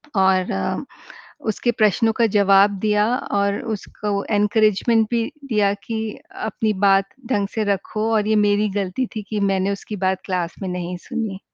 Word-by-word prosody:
और 190 -1 +3
अ, 95 - -2 0.7
उसके 220 +3 +1
प्रश्नों 220 +1 +2
का 230 +1 +2
जवाब 200 0 +6
दिया 210 0 +2 0.3
और 200 0 +1 0.2
उसको 205 0 -4
इनकरेजमेंट 215 +2 +3
भी 235 -1 +1 0.2
दिया 210 -4 +2
कि 225 0 -3 0.4
अपनी 220 0 -1
बात 195 0 +4 0.2
ढंग 200 -5 +1
से 220 - 0
रखो 215 +3 -3
और 210 -1 +2
ये 220 - +3
मेरी 205 +1 +2
गलती 200 +7 -2
थी 215 - -2
कि 215 -1 -2
मैंने 190 +1 0
उसकी 200 +1 -5
बात 190 0 0
क्लास 180 -3 -2
में 190 - -2
नहीं 180 0 -4
सुनी। 220 -6 -3
205 Hz, 160 wpm, -21 LUFS, 195-220 Hz, 0.7 s, जवाब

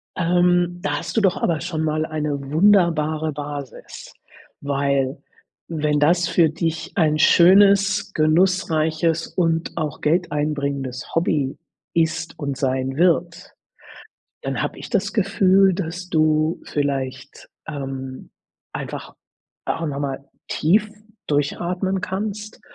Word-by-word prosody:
Ähm, 175 0 +2
da 145 -2 -1
hast - - -6
du - - +4
doch 190 -3 +2
aber 165 -3 0
schon 165 -3 -3
mal 155 0 0
eine 150 -2 -3
wunderbare 160 -4 +3
Basis, 145 -2 -8 0.5
weil, 140 -1 0 0.5
wenn 150 -2 0
das 170 +3 +3
für 165 -2 +3
dich 165 0 -3
ein 155 -4 +2
schönes, 200 +4 +5
genussreiches 160 -1 +1
und 165 -2 -1
auch 150 -1 -4
geldeinbringendes 145 -5 -1
Hobby 150 -5 0 0.4
ist 165 0 -1
und 140 -3 -3
sein 130 0 -1
wird, 170 0 +1 0.9
dann - - -3
habe - - -3
ich - - -9
das 205 -2 0
Gefühl, 195 -2 +3
dass 180 0 -5
du 155 0 +1
vielleicht, 135 -2 -4 0.2
ähm, 135 -2 -6 0.4
einfach - - -6 0.5
auch 165 - -2
noch 140 -1 -4
mal 140 -1 -3 0.2
tief 205 +7 +2 0.4
durchatmen 180 +6 -1
kannst 210 +3 -5
160 Hz, 115 wpm, -22 LUFS, 145-180 Hz, 0.9 s, schönes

